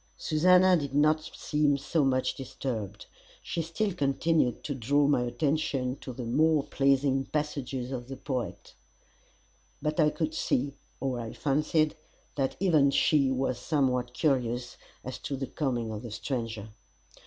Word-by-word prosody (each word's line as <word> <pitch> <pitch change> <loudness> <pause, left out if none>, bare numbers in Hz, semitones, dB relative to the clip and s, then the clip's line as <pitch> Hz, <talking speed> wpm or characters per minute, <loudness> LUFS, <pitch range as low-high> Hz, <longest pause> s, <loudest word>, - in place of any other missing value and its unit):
Susannah 180 +4 +5
did 140 -3 -4
not 155 +2 +4
seem 150 -2 +1
so 150 +3 0
much 130 -1 +1
disturbed, 110 -6 -5 0.4
she 170 - -2
still 175 +5 -1
continued 145 -3 +1
to 145 - -3
draw 140 +3 +2
my 140 -3 +3
attention 135 0 0
to 130 - -8
the 125 0 -6
more 150 +5 +3
pleasing 135 -1 +2
passages 135 -4 -3
of 125 -2 -5
the 135 0 -7
poet; 130 -5 -4 1.1
but 155 +2 -2
I 155 -1 +5
could 160 0 -2
see, 140 -3 0 0.3
or 130 -2 -2
I 115 -1 -5
fancied, 150 +2 +1 0.4
that 135 -2 -1
even 160 -7 +4
she 140 0 +3
was 130 -1 -1
somewhat 125 -5 0
curious 125 -4 0 0.3
as 130 - -6
to 140 - -4
the 135 0 -3
coming 120 -7 -2
of 105 -1 -5
the 120 - -7
stranger. 110 -1 -4
135 Hz, 145 wpm, -29 LUFS, 125-150 Hz, 1.1 s, Susannah